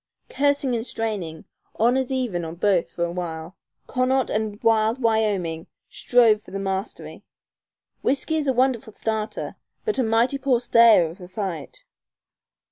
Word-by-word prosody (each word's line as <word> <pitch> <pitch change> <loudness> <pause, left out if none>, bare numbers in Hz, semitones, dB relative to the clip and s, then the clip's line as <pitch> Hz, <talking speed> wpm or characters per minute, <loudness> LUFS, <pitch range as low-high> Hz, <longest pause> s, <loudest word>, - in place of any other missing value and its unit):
Cursing 285 -1 +1
and 225 - -2
straining, 205 -10 -4 0.3
honors 250 +3 +2
even 240 -10 -1
on 165 0 -6
both 185 -1 +1
for 170 - -3
a 170 - -4
while, 170 -1 -5 0.3
Connaught 255 0 0
and 215 -1 -2
wild 225 +1 +3
Wyoming 205 -8 0 0.2
strove 230 -4 +3
for - - -16
the 195 - -5
mastery. 195 +1 -5 0.8
Whiskey 300 +3 +1
is 300 -2 -1
a - - +4
wonderful 250 -4 0
starter 220 0 -3 0.3
but 430 - 0
a - - +3
mighty 235 +5 +2
poor 260 -3 +2
stayer 230 -6 +6
of 170 +4 -11
a 180 - -9
fight. 185 -6 -6
220 Hz, 145 wpm, -23 LUFS, 185-255 Hz, 0.8 s, stayer